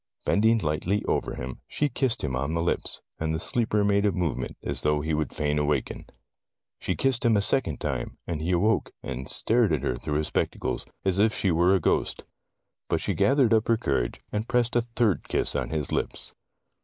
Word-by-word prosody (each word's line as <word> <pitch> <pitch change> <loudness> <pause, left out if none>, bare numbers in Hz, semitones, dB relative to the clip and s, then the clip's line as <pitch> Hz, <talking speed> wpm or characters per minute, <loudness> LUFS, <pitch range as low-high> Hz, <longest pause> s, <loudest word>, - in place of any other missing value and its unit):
Bending 110 +2 +4
lightly 90 +3 -1
over - - -1
him, 65 +1 -6
she 150 - 0
kissed 125 -2 0
him 65 -4 -1
on 70 +5 -1
the 85 - 0
lips, 85 - 0 0.2
and 80 0 -1
the - - -2
sleeper 105 +1 +1
made 100 0 +3
a 105 - +3
move 90 -6 -1
ment, - - -5
as - - -1
though 75 0 +1
he 80 +1 -2
would 75 -1 -1
fain 75 0 0
awaken. 75 -2 -1 0.7
She - - -1
kissed 135 -3 +1
him 115 -2 +4
the 100 - +3
second 100 - +1
time, 65 -5 -3
and 80 -3 -3
he 80 - -2
awoke 95 +5 +1
and 65 +2 -5
stared 115 -4 +2
at 75 -4 0
her 60 - 0
through 75 +4 -3
his 75 0 0
spec - - 0
tacles, - - -3 0.2
as 95 0 +1
if 110 +1 +3
she 95 - +1
were 90 +3 +4
a - - +2
ghost. - - 0 0.7
But - - +1
she - - -1
gathered 135 -4 +3
up 110 -1 +3
her 115 - +3
courage, 70 - -1
and 105 +2 -2
pressed 120 -1 +1
a 120 - +4
third 115 -4 0
kiss - - 0
on - - -1
his 75 -3 -2
lips. - - -3
90 Hz, 215 wpm, -26 LUFS, 75-115 Hz, 0.7 s, Bending